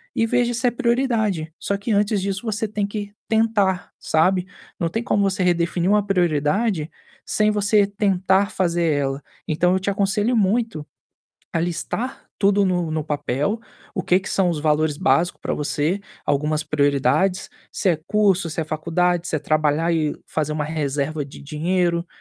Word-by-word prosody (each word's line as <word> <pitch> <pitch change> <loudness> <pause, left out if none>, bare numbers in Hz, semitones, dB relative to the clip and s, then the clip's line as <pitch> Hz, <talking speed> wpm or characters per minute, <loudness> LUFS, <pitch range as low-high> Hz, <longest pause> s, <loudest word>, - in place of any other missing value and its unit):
e 225 - +2
vê 245 +1 +2
se 235 +2 +1
é - - +3
prioridade. 230 -10 0
Só 200 - -1
que, 200 +4 -7
antes 205 -1 +2
disso, 195 -1 -2
você 220 0 -1
tem 210 0 -2
que 205 0 -5 0.2
tentar, 220 -5 +1
sabe. 180 +3 +2 0.3
Não 170 -2 0
tem 225 +6 -2
como 205 -4 +1
você 195 -1 0
redefinir 175 +1 +1
uma 205 -1 +3
prioridade 175 0 +1 0.3
sem 215 0 +2
você 205 0 +3
tentar 195 -1 +1
fazer 175 -2 0
ela. 140 0 -1 0.2
Então, 170 +3 +2
eu 190 - +2
te 195 - -2
aconselho 205 +4 +1
muito 215 -5 +1 0.7
a 165 - 0
listar 175 +9 -3
tudo 200 0 +3
no 175 -3 0
no 155 -1 -2
papel, 150 - -1 0.3
o - - -2
que 180 +2 +3
que - - -7
são 190 -2 +2
os 165 -3 -1
valores 150 -1 +1
básicos 175 0 +1
pra - - -2
você, 150 +5 -1 0.2
algumas 150 +2 0
prioridades, 150 +7 +1 0.2
se - - 0
é 165 - +1
curso, 195 -5 +2
se 160 - -3
é 160 - -2
faculdade, 170 +3 0
se 155 - 0
é - - 0
trabalhar 155 +2 +1
e 155 -2 0
fazer 155 -1 -2
uma 150 -1 -2
reserva 145 -1 -2
de 140 - -12
dinheiro, 170 +3 0
180 Hz, 170 wpm, -22 LUFS, 155-205 Hz, 0.7 s, é